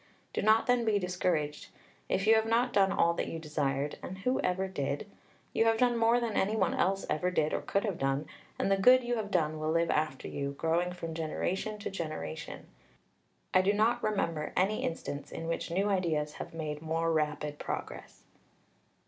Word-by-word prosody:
Do - - -1
not 220 +2 +4
then 245 -1 +3
be 220 -2 +2
discouraged. 180 -5 -1 0.4
If 195 - +1
you 220 - +7
have 220 0 +3
not 240 +2 +2
done 195 -1 +4
all 170 -3 +3
that - - -2
you 165 - -4
desired 145 -2 -2
and 190 - -6
who 250 +7 0
ever 190 +1 0
did? 145 -3 -3 0.5
you 225 - +3
have 225 0 +4
done 245 0 +3
more 230 +1 +4
than 235 -2 -2
any 205 +3 +1
one 190 -5 +1
else 195 +2 +1
ever 155 +4 0
did 155 -4 +1
or - - 0
could 200 - 0
have 200 -5 -2
done, 135 +2 0 0.3
and 195 - 0
the 195 - +4
good 250 +6 +6
you 240 0 -1
have 210 -2 -3
done 155 -5 0
will 155 0 -1
live 165 +1 +2
after 150 -3 -1
you, 140 0 -3
growing 165 +4 0
from 165 -2 -6
generation 180 +6 -2
to 205 - -5
generation. 155 - -5 0.9
I - - +6
do 195 +2 +2
not 220 +3 +2
remember 165 -7 -1
any 195 +4 +2
instance 145 -3 -4
in 165 - -5
which 165 - -2
new 190 +4 +1
ideas 165 -7 0
have - - -7
made 150 -2 -4
more 165 +1 0
rapid 150 -1 -1
progress." - - -6
180 Hz, 195 wpm, -31 LUFS, 155-210 Hz, 0.9 s, you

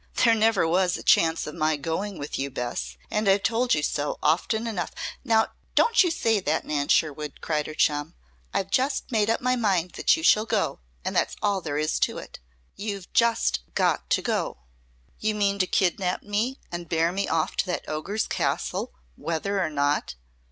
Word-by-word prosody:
"There 230 - +6
never 220 -5 +3
was 180 +2 +2
a - - -9
chance 165 0 +3
of 150 - -6
my 155 -2 +1
going 165 +7 -3
with 145 - -5
you, 140 +1 -1
Bess, 65 - -4
and 210 -1 +1
I've 195 +1 +3
told 235 0 +2
you 150 - -1
so 145 0 -1
often 220 +9 +1
enough 200 -8 -2 0.2
" - - -11
"Now, 225 -3 +3 0.3
don't 465 -3 +5
you 355 - +1
say 225 -10 +1
that, 160 -4 -1
Nan 145 -1 -1
Sherwood!" 150 -1 0
cried 150 -2 -1
her 155 - -7
chum. 150 +3 +1 0.4
"I've 195 0 -2
just 270 +2 0
made 215 -2 +2
up 225 - +1
my 255 0 +2
mind 190 -7 +1
that - - +2
you 160 - -6
shall 215 +5 +5
go, - - 0 0.3
and - - -2
that's - - +1
all 200 -2 +1
there 145 -3 -3
is 155 +1 0
to - - 0
it! - - -9 0.4
You've 200 -3 -6
just 230 - +3 0.2
got - - +1
to - - +2
go!" - - -1 0.6
"You 215 0 0
mean 200 -1 +1
to 185 - +2
kidnap 180 -1 0
me 220 +6 -1
and 175 -1 -6
bear 165 +1 +2
me 195 +2 -1
off 160 -1 0
to - - +2
that 180 - -3
ogre's 195 +8 -2
castle, - - -2 0.2
whether 195 - -2
or - - 0
not?" 145 - 0
185 Hz, 195 wpm, -26 LUFS, 155-215 Hz, 0.6 s, There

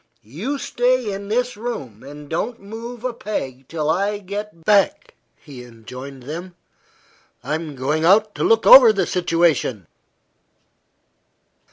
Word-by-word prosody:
"You 185 - -4
stay 245 -4 0
in 200 +1 -7
this 245 +4 -1
room 205 - -6
and 145 +1 -11
don't 225 +10 -3
move 230 +4 -9
a 255 -1 -2
peg 135 - -5
till 155 -2 -3
I 200 +6 0
get 200 -3 -7
back," 210 - +2 0.2
he 135 -5 -12
enjoined 125 +3 -11
them; 170 +6 -7 0.9
"I'm 155 -1 -4
going 145 +5 -1
out 205 +5 +4
to - - -3
look 225 -1 +3
over 255 -4 +10
the 200 -2 0
situation." 165 - 0
185 Hz, 130 wpm, -21 LUFS, 145-220 Hz, 0.9 s, over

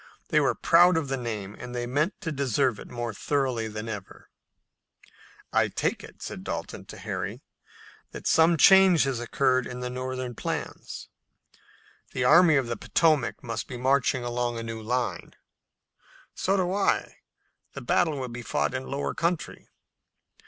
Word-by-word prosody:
They - - +4
were - - +2
proud 175 +1 +5
of 150 -4 -2
the 135 - 0
name, 110 -5 -5
and 125 0 -7
they 120 0 -2
meant 145 - -1
to 165 - -3
deserve 135 -4 0
it - - -9
more 120 -2 -4
thoroughly 130 -2 -1
than 105 +1 -6
ever. 105 -4 -8 1.2
"I - - +4
take - - -2
it," - - -12
said - - -6
Dalton - - -5
to - - -10
Harry, - - -5 0.7
"that - - -10
some 165 +1 +4
change 190 -2 +7
has 135 -3 -1
occurred 130 +1 +1
in 125 0 -7
the 125 0 -3
Northern 130 0 -4
plans. - - -5 1.1
The 130 - -1
Army 160 +4 +6
of 135 -2 +2
the 120 -1 -4
Potomac 155 0 +1
must 115 -2 -4
be 125 - -6
marching 130 0 +2
along 120 0 -2
in 115 - -4
a - - -6
new 115 -1 -6
line." 120 +3 -2 1.0
"So 195 +1 0
do 185 -1 0
I. 200 0 0 0.6
The - - -7
battle 160 -4 +1
will 130 - -3
be 120 +1 -7
fought 75 - -1
in 130 0 -4
lower 140 +1 -2
country." 170 0 -2
130 Hz, 165 wpm, -27 LUFS, 120-155 Hz, 1.2 s, change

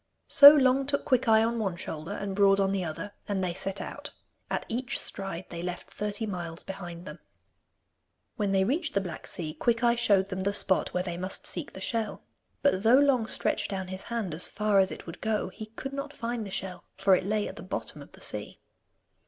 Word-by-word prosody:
So 285 +1 +11
Long 270 -1 +3
took 280 0 -1
Quickeye 235 -5 +4
on 230 0 -1
one 195 -5 -1
shoulder, 160 +1 -6
and 200 -1 -4
Broad 200 0 +5
on 195 0 +2
the 195 -2 -1
other, 170 +5 -5 0.2
and 195 -2 -1
they 180 -2 -1
set 190 +2 -2
out. - - -7 0.4
At - - -2
each 255 +4 -2
stride 190 -2 -4
they 170 -1 -6
left 180 0 -6
thirty 210 +1 -3
miles 175 -5 -5
behind 175 -3 -8
them. 150 +3 -9 1.2
When 205 -4 -1
they 190 -1 +3
reached 290 - -1
the - - +4
black 175 -4 -7
sea, 155 -3 -4
Quickeye 235 +7 +2
showed 200 -5 +2
them 190 - -3
the 200 +2 0
spot 195 -2 +2
where 180 - -1
they 175 -2 -4
must 185 +2 -3
seek - - -3
the 190 - -9
shell. 220 +1 -2 0.4
But 280 -10 +3
though 230 +4 +6
Long 270 -5 +3
stretched - - 0
down 190 -2 -4
his 190 0 -4
hand 225 -8 -3
as 160 - -1
far 210 -1 +2
as 190 0 +4
it - - -8
would 165 0 -9
go, 215 -3 -1
he 215 +3 -9
could 265 +5 -7
not 280 +1 -5
find 235 -3 -4
the - - -8
shell, 190 -1 -5
for 195 0 +5
it 185 - -1
lay 210 +2 0
at - - -8
the - - -7
bottom - - -5
of - - -14
the - - -15
sea. - - -5
200 Hz, 220 wpm, -28 LUFS, 185-230 Hz, 1.2 s, So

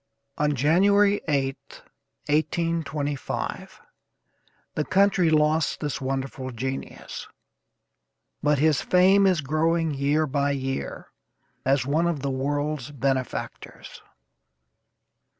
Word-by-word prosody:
On 150 0 +2
January 200 +9 +3
8th, 135 -3 -2 0.4
1825, 150 -2 -2 0.9
the 150 - -1
country 190 -1 +3
lost 155 +1 +2
this 145 -3 -3
wonderful 135 0 -3
genius, 130 +2 -6 1.1
but 150 0 +2
his 150 0 +3
fame 190 +2 +4
is 180 -4 +2
growing 160 +2 +1
year 145 +3 +1
by 140 0 0
year, 135 -1 -4 0.5
as 135 0 +2
one 155 +5 +1
of 165 -5 -2
the 140 0 -2
world's 145 +1 -2
benefactors. 135 -2 -4
150 Hz, 95 wpm, -25 LUFS, 135-165 Hz, 1.1 s, fame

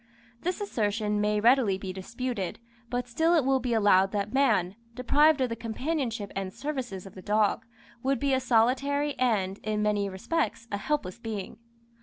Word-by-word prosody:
This 360 +3 -2
assertion 210 - -1
may 210 0 +1
readily 230 -3 +4
be 190 -1 -6
disputed, 205 +1 -4 0.3
but 245 +1 -2
still 320 +8 +2
it 305 -6 +3
will 270 0 +3
be 250 -1 -3
allowed 195 -3 +4
that 205 +1 -2
man, 215 -9 +2 0.2
deprived 290 +4 +4
of 255 - +1
the 230 - -3
companionship 230 -1 -3
and 195 -1 -3
services 255 -8 -5
of 195 - -11
the 185 - -10
dog, 210 +2 +1 0.3
would 270 0 0
be 280 0 +1
a 260 - +3
solitary 270 +5 +2
and, 205 -6 +1
in 210 0 -2
many 205 -1 +1
respects, 235 - -2
a 200 - -1
helpless 235 -4 -2
being. 220 -4 -6
230 Hz, 170 wpm, -28 LUFS, 205-265 Hz, 0.3 s, readily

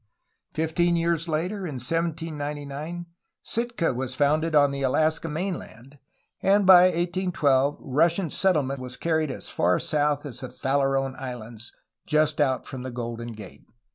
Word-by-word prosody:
Fifteen 165 +2 +1
years 170 0 0
later, 170 +6 -1
in 180 -8 -5
1799, 155 +2 -3 0.4
Sitka 235 - -1
was 130 +1 -3
founded 155 +3 +2
on 145 -1 +5
the 140 0 -4
Alaska 155 +4 +1
mainland, 150 - -6 0.4
and 200 +1 +3
by 180 -1 +9
1812 170 -6 +1
Russian 165 +5 +1
settlement 145 -8 +1
was 125 -1 -6
carried 160 -2 0
as 130 - -5
far 90 +1 +2
south 150 -1 0
as 125 -4 -6
the 130 -2 -6
Farallone 135 0 0
Islands, 120 -3 -8 0.4
just 150 0 +2
out 130 -3 +1
from 130 - -7
the 130 - -5
Golden 120 -1 -5
Gate. 105 -3 -12
150 Hz, 140 wpm, -25 LUFS, 130-170 Hz, 0.4 s, by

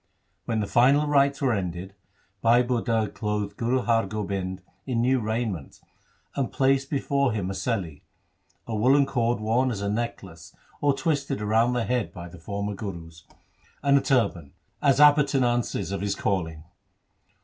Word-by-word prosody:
When 115 -2 -1
the - - -1
final 135 +7 +4
rites 140 -1 +2
were 130 -3 +3
ended, 95 -1 -4 0.5
Bhai 120 +2 +5
Budha 115 -3 0
clothed 105 -1 -3
Guru 125 +3 0
Har 115 -3 +2
Gobind 95 -3 -4 0.2
in 125 -3 0
new 130 +2 +2
raiment, 110 - -3 0.6
and 135 -4 -1
placed 135 0 +1
before 140 -2 +1
him 95 -3 -2
a - - -4
seli 95 - -3 0.3
— - - -42
a 115 - -3
woollen 135 +6 +4
cord 120 -3 0
worn 115 +5 +1
as 110 -5 -3
a 100 - -1
necklace 95 -7 -5 0.3
or 145 -1 +3
twisted 140 -4 -1
round 110 +4 +2
the 120 - 0
head 125 -2 -1
by 85 -1 -8
the 90 0 -13
former 100 +4 -4
Gurus 85 -5 -8 0.3
— - - -34
and 140 0 +4
a 140 - +4
turban, 100 - 0 0.3
as 140 -1 +3
appurtenances 135 - +3
of 100 - -3
his 100 -1 -1
calling. 80 -7 -2
115 Hz, 160 wpm, -25 LUFS, 100-130 Hz, 0.6 s, Bhai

